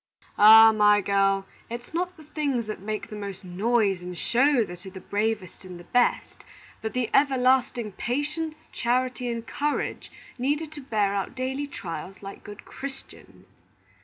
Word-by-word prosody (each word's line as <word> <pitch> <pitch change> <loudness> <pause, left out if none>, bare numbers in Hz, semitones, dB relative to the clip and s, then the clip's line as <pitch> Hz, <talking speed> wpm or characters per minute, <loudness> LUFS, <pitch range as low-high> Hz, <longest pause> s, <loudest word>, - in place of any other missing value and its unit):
"Ah, 220 +1 +10
my 210 -1 +5
girl, 195 -1 +2 0.2
it's 240 +5 -7
not 360 +2 -2
the 315 - -13
things 285 -6 -2
that 215 -3 -6
make 215 +1 -4
the 210 - -8
most 200 -2 -7
noise 200 +1 +1
and 180 0 -7
show 250 - +3
that 175 -1 -10
are 190 - -8
the 190 0 -10
bravest 205 -1 -2
and 180 -2 -9
the - - -11
best; 245 +6 0 0.4
but 220 - -4
the 250 -3 -1
everlasting 255 -4 +2
patience, 300 - -3
charity, 250 +1 -1
and 230 -1 -5
courage 295 0 -2 0.3
needed 295 +4 -1
to 300 -2 -8
bear 210 -6 0
our 195 -1 -1
daily 265 +3 -3
trials 190 -5 -7
like 195 0 -9
good 205 0 -11
Christians." 270 0 -10
230 Hz, 160 wpm, -26 LUFS, 200-265 Hz, 0.4 s, Ah